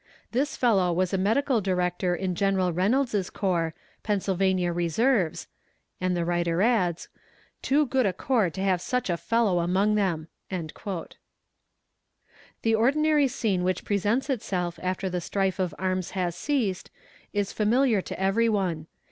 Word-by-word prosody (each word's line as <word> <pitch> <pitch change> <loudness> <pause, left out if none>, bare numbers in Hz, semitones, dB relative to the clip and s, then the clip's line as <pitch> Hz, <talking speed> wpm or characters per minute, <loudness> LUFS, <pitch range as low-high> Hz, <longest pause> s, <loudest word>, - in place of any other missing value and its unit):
This 275 +5 -1
fellow 195 -8 +3
was 185 +2 0
a - - +2
medical 230 +5 +2
director 180 -1 0
in 185 0 -2
General 190 -1 +1
Reynolds' 205 +2 +1
corps, 170 -5 -1 0.3
Pennsylvania 190 -3 0
Reserves," 175 - +1 0.6
and 185 -1 0
the 170 - 0
writer 175 +1 +1
adds, 185 -8 +1 0.5
"too 295 +3 +2
good 260 -3 +1
a - - +2
corps 225 -1 +1
to 190 +4 -6
have 185 -3 +1
such 250 -1 -1
a - - +1
fellow 220 -1 +1
among 190 +5 +2
them." 180 -7 0 0.2
The 175 +1 -5 1.6
ordinary 290 +5 +3
scene 220 -8 -1
which 185 -1 -1
presents 210 +6 0
itself 185 - -2
after 185 +1 -2
the 180 -1 -2
strife 195 +1 -1
of 185 -2 -1
arms 185 -1 -1
has 175 -2 -1
ceased, 225 -6 -1 0.4
is 205 -1 -1
familiar 225 0 +2
to - - -7
every 200 +5 +2
one. 180 -7 -1
190 Hz, 140 wpm, -26 LUFS, 180-225 Hz, 1.6 s, fellow